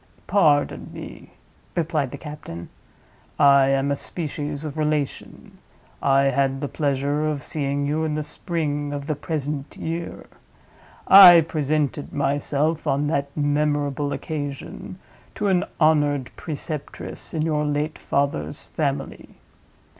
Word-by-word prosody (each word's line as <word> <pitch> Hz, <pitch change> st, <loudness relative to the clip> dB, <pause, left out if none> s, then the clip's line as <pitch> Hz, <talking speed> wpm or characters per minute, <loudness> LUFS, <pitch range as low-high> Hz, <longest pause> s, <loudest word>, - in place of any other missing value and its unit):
"Pardon 150 Hz, -8 st, +2 dB
me," -, -, -10 dB, 0.5 s
replied 155 Hz, -5 st, 0 dB
the -, -, -7 dB
captain; 150 Hz, -, -8 dB, 0.7 s
"I 140 Hz, -1 st, +6 dB
am 135 Hz, +1 st, +1 dB
a -, -, +2 dB
species 150 Hz, -1 st, -5 dB
of 150 Hz, -1 st, -5 dB
relation. 150 Hz, -2 st, -3 dB, 0.4 s
I 135 Hz, 0 st, +4 dB
had 135 Hz, 0 st, +1 dB
the 145 Hz, -, -2 dB
pleasure 145 Hz, +1 st, 0 dB
of 145 Hz, -2 st, -3 dB
seeing 140 Hz, -1 st, -2 dB
you 150 Hz, +2 st, 0 dB
in 155 Hz, -1 st, -1 dB
the 155 Hz, -, -2 dB
spring 150 Hz, -2 st, -2 dB
of 140 Hz, -1 st, -4 dB
the 155 Hz, -, -1 dB
present 145 Hz, -1 st, -4 dB
year. 165 Hz, +1 st, -5 dB, 0.8 s
I 180 Hz, -3 st, +11 dB
presented 150 Hz, -2 st, -1 dB
myself 145 Hz, +3 st, 0 dB
on 140 Hz, +2 st, +1 dB
that 140 Hz, -2 st, 0 dB
memorable 145 Hz, -1 st, 0 dB
occasion 140 Hz, -, -5 dB, 0.4 s
to 205 Hz, -, 0 dB
an 180 Hz, -2 st, +2 dB
honored 145 Hz, -4 st, +2 dB
preceptress 155 Hz, +1 st, -6 dB
in 155 Hz, -, 0 dB
your 155 Hz, -2 st, 0 dB
late 150 Hz, +1 st, -1 dB
father's 140 Hz, +1 st, -1 dB
family. 140 Hz, -3 st, -4 dB
145 Hz, 125 wpm, -23 LUFS, 140-155 Hz, 0.8 s, I